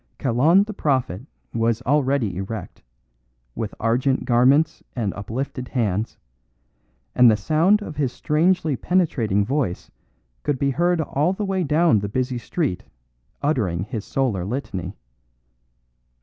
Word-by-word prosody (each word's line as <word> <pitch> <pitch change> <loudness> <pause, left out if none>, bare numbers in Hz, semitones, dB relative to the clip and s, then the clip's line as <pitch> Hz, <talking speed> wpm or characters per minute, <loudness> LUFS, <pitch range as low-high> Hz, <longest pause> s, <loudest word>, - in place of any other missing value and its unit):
Kalon 145 - +4
the 215 +1 -7
Prophet 130 - -1 0.3
was 115 +1 0
already 135 -8 +1
erect, 100 +4 -6 0.7
with 110 - -5
argent 125 +4 +1
garments 135 +6 +3
and 110 -6 -1
uplifted 125 +5 -5
hands, 110 -4 -1 1.0
and 125 - +7
the 110 - +3
sound 165 - +2
of 150 -7 -8
his 135 -4 0
strangely 160 +1 +1
penetrating 120 - +1
voice 130 -7 -2 0.5
could 145 - -1
be 140 +1 +1
heard 175 +3 +1
all 155 +4 0
the 205 +2 -3
way 190 -2 0
down 155 -5 +3
the 100 0 -4
busy 125 +2 -1
street 135 - -2 0.6
uttering 105 - 0
his 105 0 -5
solar 120 -10 -1
litany. 100 - -4
130 Hz, 125 wpm, -22 LUFS, 110-155 Hz, 1.0 s, and